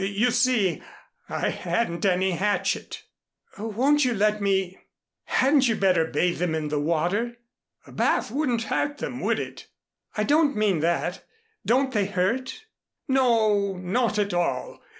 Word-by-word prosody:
You 200 +5 +1
see, 235 -6 +2 0.5
I - - -1
hadn't 185 -5 -1
any 190 0 +2
hatchet." 205 +4 -1 0.6
"Won't 255 +8 +2
you 250 -2 +1
let 210 +1 +1
me 190 -2 0 0.5
hadn't 270 0 +3
you 230 - +1
better 185 -5 +2
bathe 175 +1 0
them 170 -2 0
in 155 -1 -3
the 150 0 -1
water?" 175 +10 -1 0.5
"A - - -15
bath - - 0
wouldn't 255 -5 0
hurt 290 +6 -1
them, - - -5
would - - 0
it?" - - -7 0.5
"I 210 - +1
didn't 295 +3 +3
mean 210 -5 +1
that. 170 +3 -1 0.4
Don't 260 +3 +2
they 205 -3 +1
hurt?" 235 - -2 0.4
"No, 220 -7 +2
not 210 +5 0
at 205 -2 0
all. 175 - -2
210 Hz, 145 wpm, -25 LUFS, 185-250 Hz, 0.6 s, hadn't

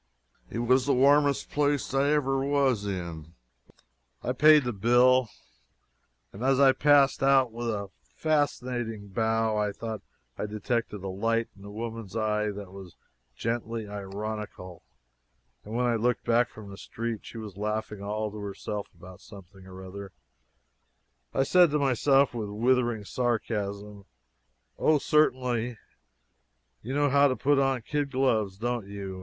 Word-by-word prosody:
It - - -6
was 125 +3 +2
the 140 - +3
warmest 140 +2 +3
place 145 -2 0
I 135 +1 +2
ever 135 -2 +1
was 135 -7 +1
in. 85 -4 -6 0.9
I - - -1
paid 150 +2 +6
the 120 -1 -2
bill, 120 +3 +4 1.0
and 100 - -10
as 135 0 +3
I 135 -1 +7
passed 140 0 +4
out 135 -3 +4
with 120 +1 -4
a 100 -3 -4
fascinating 125 -8 -2
bow 110 +1 0
I 105 -1 0
thought 110 0 -6 0.4
I - - -2
detected 105 -1 -3
a - - -4
light 115 +5 -1
in 100 - -17
the 100 - -10
woman's 110 -1 -6
eye 105 -1 0
that 100 -2 -7
was 95 -2 -11 0.4
gently 115 - -3
ironical; 100 -2 -6 0.8
and 110 +2 -7
when 125 +1 +1
I 120 -1 +2
looked 120 +2 0
back 120 +1 +3
from 105 -2 -11
the 100 - -10
street, 115 +3 -5
and - - -23
she - - -9
was 105 -4 -8
laughing 105 0 -3
all 105 +1 -3
to 105 - -9
herself 100 0 -5
about 90 +1 -13
something 95 -2 -14
or 95 0 -10
other, 100 0 -9 1.2
I 135 - +1
said 175 +5 +5
to 150 - +1
myself 135 0 +3
with 110 -4 -4
withering 120 0 +1
sarcasm, 105 -4 -3 0.7
"Oh, 155 - +4
certainly; 125 -6 +1 1.0
you 130 +5 -5
know 145 -1 +2
how 140 +1 +5
to 130 - 0
put 140 +1 +2
on 135 -3 +1
kid 145 +3 -2
gloves, 110 -8 0
don't 120 -1 -3
you? 100 -2 -7
115 Hz, 150 wpm, -27 LUFS, 100-130 Hz, 1.2 s, I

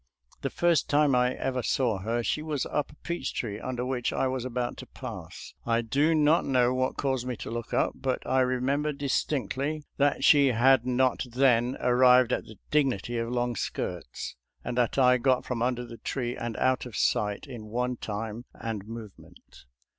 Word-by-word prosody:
The - - -1
first 170 -3 +2
time 145 -1 +4
I 125 0 +2
ever 130 -1 -2
saw 120 -4 0
her 115 +5 -1
she 150 - -1
was 155 -3 -2
up 150 - -2
a - - -17
peach 170 -3 -4
tree 105 -3 -3
under 125 0 -3
which 125 -2 -1
I - - 0
was 130 -1 -2
about 125 -1 -2
to - - -9
pass. - - -9
I 115 0 +1
do 145 +8 +2
not 155 +2 +4
know 125 -2 +2
what 130 0 -1
caused 130 -3 -1
me 125 -3 -3
to - - -7
look 120 0 -5
up, - - +2
but 130 -1 -3
I 130 +1 +2
remember 130 +4 +1
distinctly 140 +1 -1
that 145 0 +2
she 145 -2 +6
had 125 0 +4
not 130 +1 +1
then 125 0 +3
ar 125 0 +1
rived 125 -1 +6
at - - -1
the 110 - -13
dignity 120 -6 +1
of 115 0 -2
long 120 0 -1
skirts, - - -4 0.3
and 120 - -3
that 120 - +2
T 125 -2 +5
got 130 0 +2
from 120 -2 -3
under 125 0 0
the 115 -1 -10
tree 125 -1 -3
and 115 -2 -4
out 130 -1 +1
of 115 - -10
sight 105 +4 0
in 120 -6 -9
one 125 +3 -1
time 110 +2 -5
and 110 -3 -5
movement. 110 - -12
125 Hz, 190 wpm, -28 LUFS, 120-135 Hz, 0.3 s, she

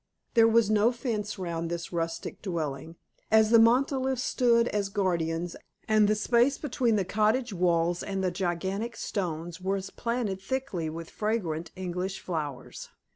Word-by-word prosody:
There 230 -2 +6
was 225 -2 +4
no 215 +2 +4
fence 220 -4 -3
round 170 -3 -3
this 170 +1 -5
rustic 165 -1 -3
dwelling, 160 -4 -4 0.3
as 220 0 +5
the 230 - +8
monoliths 260 +2 +3
stood 235 -2 +3
as 200 -1 -1
guardians, 175 -3 -1 0.3
and 215 -1 +4
the 215 - +3
space 240 +5 +3
between 245 -5 0
the 195 -3 +1
cottage 220 +4 +1
walls 175 -1 +1
and 195 -1 -3
the 185 - +1
gigantic 190 +5 -2
stones 170 -4 -4
was 195 +1 -2
planted 230 -5 -2
thickly 195 -7 -3
with 165 +1 -7
fragrant 175 -7 -2
English 185 +1 -3
flowers. 150 -7 -5
195 Hz, 145 wpm, -28 LUFS, 170-230 Hz, 0.3 s, the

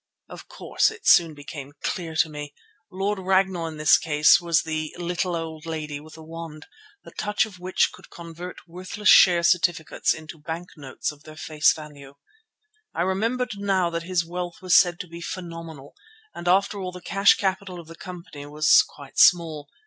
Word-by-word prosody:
Of - - -11
course - - 0
it 440 0 -12
soon 165 -3 +5
became 145 -1 -9
clear 165 -3 -3
to 160 - +3
me. 150 -1 -8 0.3
Lord 195 +1 -2
Ragnall 190 -2 +1
in 160 -1 -8
this 155 -1 +5
case 150 0 +4
was 170 -2 +2
the 155 -1 -4
little 175 +1 -2
old 165 0 -6
lady 155 -3 -4
with 155 +1 -14
the 160 - -12
wand, 160 -1 -9 0.4
the - - -13
touch 210 0 0
of 195 -4 -13
which 185 +1 +1
could - - -15
convert 170 +2 -10
worthless 185 +4 -2
share 175 -2 +7
certificates 170 -2 +1
into 160 0 -6
bank 165 +3 -6
notes 140 -3 -5
of 150 -1 -17
their 155 0 -13
face 155 -1 +2
value. 145 -3 -10 0.8
I - - 0
remembered 215 +4 -1
now 190 -3 +1
that 170 0 -3
his 170 0 -1
wealth 175 0 -5
was 185 -3 +2
said 175 -1 +5
to 180 - -10
be 170 +1 -10
phenomenal 165 -5 -8 0.4
and 175 - -8
after 200 +3 +2
all 185 -1 -4
the 180 - -9
cash 195 +2 +4
capital 190 -2 -3
of 170 - -11
the 165 - -11
company 170 -5 -10
was 150 +1 +5
quite 140 -1 -9
small. 160 -4 +4
170 Hz, 180 wpm, -24 LUFS, 155-185 Hz, 0.8 s, share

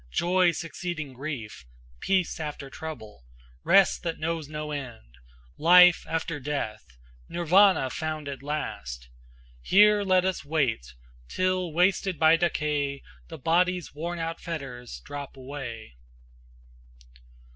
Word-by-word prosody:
joy 180 - +3
succeeding 165 -3 -5
grief! 125 - -6 0.4
Peace 185 -4 0
after 150 -3 -6
trouble! 110 - -9 0.4
rest 195 +1 +4
that 165 -2 -3
knows 160 -2 -3
no 150 0 -5
end! 120 - -7 0.5
Life 180 +1 +7
after 165 -1 -2
death! 140 -6 -4 0.5
Nirvana 175 -4 +4
found 155 -2 -4
at 140 -2 -6
last! 60 - -5 0.5
Here 210 - +5
let 185 -2 +3
us 190 -3 -1
wait 125 - -1 0.3
till 185 -2 0
wasted 180 +2 +1
by 160 +1 +6
decay 150 -4 -1 0.2
The 160 - -9
body's 180 +4 +1
worn 170 +4 -4
out 165 0 -4
fetters 135 -8 -7
drop 145 -1 -7
away." 130 - -8
155 Hz, 115 wpm, -27 LUFS, 140-175 Hz, 0.5 s, Life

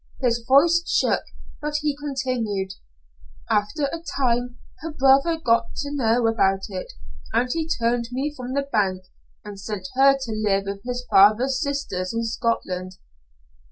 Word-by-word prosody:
His 235 -3 0
voice 330 +6 +5
shook, - - +1 0.4
but 300 0 -3
he 295 -2 0
continued. 255 -9 -2 0.8
"After 210 +9 0
a 325 +4 -2 0.2
time 245 -2 0 0.2
her 320 +4 -5
brother 275 +4 +4
got 230 -6 +1
to 285 0 -5
know 240 -3 +2
about 195 -4 +2
it, 185 -2 -6 0.4
and 235 +2 +2
he 325 -1 -2
turned 235 -3 0
me 275 +4 -2
from 255 -1 -6
the 280 - +1
bank, 195 -8 0 0.4
and 205 -1 -8
sent 195 -2 -5
her 275 +1 +5
to 260 -4 -5
live 210 -2 +1
with 200 0 -5
his 250 0 -4
father's 215 +7 +5
sisters 250 -10 -3
in 230 - 0
Scotland. 185 -5 -2
245 Hz, 150 wpm, -23 LUFS, 210-275 Hz, 0.8 s, voice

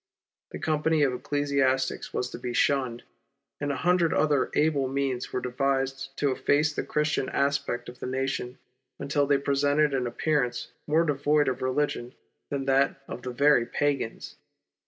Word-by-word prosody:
The - - -7
company 155 0 +1
of 135 -3 +2
ecclesiastics 135 -1 0
was 125 0 -2
to - - -7
be 125 0 -4
shunned, 125 -2 +1 0.6
and 145 0 -1
a - - -2
hundred 180 -2 +3
other 145 -4 +2
able 150 -3 +2
means 135 -2 -2
were 125 - -2
devised 135 +1 -1
to 145 -2 +1
efface 150 +3 +2
the - - -2
Christian 150 -2 -1
aspect 140 -3 -1
of 125 - -10
the - - -5
nations 130 -1 -2 0.4
until 140 0 0
they 140 0 +4
presented 145 +1 +2
an 130 -2 0
appearance 125 -1 -1 0.2
more 155 +2 +3
devoid 145 0 +2
of 130 - -1
religion 130 -2 -1 0.3
than 140 -1 -2
that 135 0 +2
of 125 - -7
the 125 - -5
very 125 -1 +3
pagans. 140 -5 -2
140 Hz, 155 wpm, -27 LUFS, 130-145 Hz, 0.6 s, they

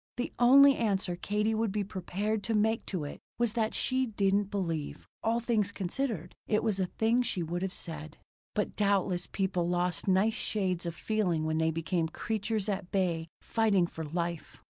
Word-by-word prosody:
The 245 - -3
only 275 +3 +8
answer 195 -5 0
Katie 210 +4 0
would 220 -1 0
be 210 0 -1
prepared 200 +3 -2
to 225 - 0
make 220 +2 +1
to 180 -6 -2
it 145 - -6 0.2
was 240 -3 +1
that 225 -2 0
she 260 0 +1
didn't 200 -2 +1
believe, 165 -7 -3 0.2
all 230 +1 +2
things 225 -4 +1
considered, 195 - -3
it 215 - +2
was 215 -4 +1
a 185 - +1
thing 225 +6 +2
she 195 -7 -1
would 175 +2 -3
have 190 0 -1
said. 155 -4 -5 0.4
But 210 - -1
doubtless 195 -3 +1
people 185 -3 -1
lost 175 +1 0
nice 195 +4 +3
shades 185 -6 -1
of 170 - -4
feeling 185 -8 0
when 155 0 0
they 160 0 +2
became 165 +1 -1
creatures 215 +3 -2
at 195 -3 -2
bay 170 -4 0
fighting 215 -6 +2
for 165 -1 -6
life. 170 +1 -4
195 Hz, 180 wpm, -30 LUFS, 175-220 Hz, 0.4 s, only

